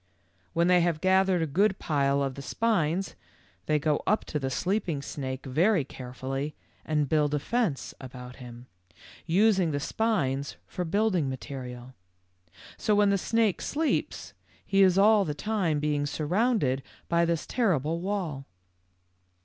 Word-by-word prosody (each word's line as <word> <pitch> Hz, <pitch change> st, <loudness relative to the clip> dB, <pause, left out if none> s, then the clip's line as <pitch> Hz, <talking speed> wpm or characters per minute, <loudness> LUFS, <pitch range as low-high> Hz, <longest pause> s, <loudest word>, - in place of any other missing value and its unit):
" 90 Hz, 0 st, -39 dB
When 170 Hz, +1 st, +3 dB
they 180 Hz, -1 st, +5 dB
have 170 Hz, -2 st, +1 dB
gathered 190 Hz, -1 st, +3 dB
a -, -, +1 dB
good 190 Hz, +6 st, +2 dB
pile 140 Hz, -2 st, +1 dB
of 135 Hz, -1 st, -2 dB
the 140 Hz, -, -8 dB
spines, 190 Hz, 0 st, 0 dB, 0.5 s
they 155 Hz, -, +3 dB
go 150 Hz, 0 st, 0 dB
up 215 Hz, -, +2 dB
to 150 Hz, -, -3 dB
the 135 Hz, -1 st, -2 dB
sleeping 175 Hz, -2 st, -1 dB
snake 130 Hz, -2 st, -5 dB
very 165 Hz, +6 st, +2 dB
carefully 135 Hz, +3 st, -5 dB, 0.3 s
and 150 Hz, -2 st, 0 dB
build 150 Hz, 0 st, +2 dB
a -, -, 0 dB
fence 210 Hz, -, -1 dB
about 125 Hz, -1 st, -9 dB
him, 120 Hz, -1 st, -11 dB, 0.6 s
using 190 Hz, 0 st, +3 dB
the 145 Hz, -2 st, -1 dB
spines 140 Hz, -8 st, -1 dB
for 180 Hz, -, -4 dB
building 185 Hz, -5 st, +1 dB
material. 130 Hz, -2 st, -7 dB, 0.8 s
So 210 Hz, -, +1 dB
while 205 Hz, 0 st, +4 dB
the 200 Hz, 0 st, +3 dB
snake 225 Hz, -1 st, +1 dB
sleeps, 315 Hz, +1 st, -2 dB, 0.3 s
he 195 Hz, 0 st, +3 dB
is 190 Hz, -1 st, +5 dB
all 210 Hz, +1 st, +6 dB
the 150 Hz, -5 st, -3 dB
time 185 Hz, -6 st, 0 dB
being 145 Hz, -1 st, 0 dB
surrounded 155 Hz, -, +1 dB, 0.3 s
by 170 Hz, 0 st, +2 dB
this 170 Hz, -1 st, 0 dB
terrible 165 Hz, -, 0 dB
wall. 175 Hz, -8 st, -3 dB
160 Hz, 150 wpm, -28 LUFS, 140-195 Hz, 0.8 s, all